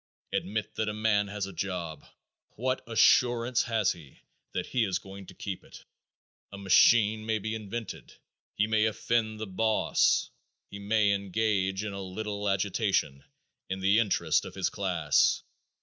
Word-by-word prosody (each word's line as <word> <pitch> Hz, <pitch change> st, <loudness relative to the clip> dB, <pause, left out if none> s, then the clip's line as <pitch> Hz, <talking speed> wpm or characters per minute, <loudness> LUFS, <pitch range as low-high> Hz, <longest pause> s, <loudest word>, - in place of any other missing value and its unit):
Admit 105 Hz, +2 st, -2 dB
that 110 Hz, -1 st, -1 dB
a -, -, -3 dB
man 105 Hz, -1 st, +1 dB
has 100 Hz, 0 st, -3 dB
a 100 Hz, -, -9 dB
job. 85 Hz, -4 st, -5 dB, 0.5 s
What 130 Hz, +3 st, -1 dB
assurance 120 Hz, +1 st, +3 dB
has 110 Hz, -5 st, +1 dB
he 75 Hz, -6 st, -12 dB, 0.3 s
that -, -, -3 dB
he 125 Hz, -, 0 dB
is 95 Hz, -4 st, 0 dB
going 95 Hz, 0 st, -11 dB
to -, -, -12 dB
keep 95 Hz, -2 st, -6 dB
it? -, -, -14 dB, 0.7 s
A 100 Hz, -, -8 dB
machine 110 Hz, +2 st, +4 dB
may 110 Hz, 0 st, 0 dB
be 110 Hz, +1 st, -4 dB
invented. 110 Hz, 0 st, -6 dB, 0.4 s
He 105 Hz, -, +2 dB
may 110 Hz, 0 st, +2 dB
offend 110 Hz, 0 st, 0 dB
the 110 Hz, -, -3 dB
boss. 110 Hz, +3 st, +1 dB, 0.4 s
He 100 Hz, -, -7 dB
may 105 Hz, 0 st, +2 dB
engage 100 Hz, -1 st, 0 dB
in 105 Hz, -2 st, -4 dB
a 100 Hz, -, -5 dB
little 100 Hz, +2 st, -4 dB
agitation 95 Hz, -, 0 dB, 0.5 s
in 95 Hz, 0 st, -3 dB
the 100 Hz, +3 st, +3 dB
interest 105 Hz, -5 st, +1 dB
of -, -, -9 dB
his -, -, -1 dB
class. 90 Hz, -7 st, +1 dB
105 Hz, 155 wpm, -29 LUFS, 95-110 Hz, 0.7 s, machine